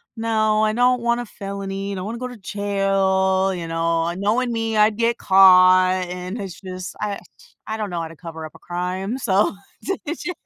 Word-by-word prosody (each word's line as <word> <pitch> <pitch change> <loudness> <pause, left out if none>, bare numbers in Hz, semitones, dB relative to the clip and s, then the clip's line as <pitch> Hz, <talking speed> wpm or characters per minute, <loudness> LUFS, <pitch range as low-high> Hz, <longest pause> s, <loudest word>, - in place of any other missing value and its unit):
no, 215 -1 +1
I 215 - +2
don't 245 +1 +3
want 235 0 +1
a - - -6
felony, 195 -1 -5
I - - -4
don't 185 +1 -5
wanna 230 +2 -5
go 250 +1 -4
to 245 - -10
jail. 195 -1 +1
You 170 -2 -5
know, 165 0 0
and 175 +3 -4
knowing 240 +4 +1
me 225 -1 -1
I'd 210 0 +4
get 235 0 +1
caught," 185 -1 +6
and 180 +4 -6
it's 190 -3 -7
just 185 -1 -7
I 205 -1 -2 0.2
just - - -21
I 220 - -3
don't 210 -2 -3
know 175 -2 -3
how 165 - -4
to 165 - -12
cover 160 -1 -8
up 155 - -12
a - - -14
crime. 185 +6 -3
So, 205 -6 +1 0.3
they're 385 - -2 0.2
j 355 - -5
195 Hz, 210 wpm, -21 LUFS, 185-220 Hz, 0.3 s, caught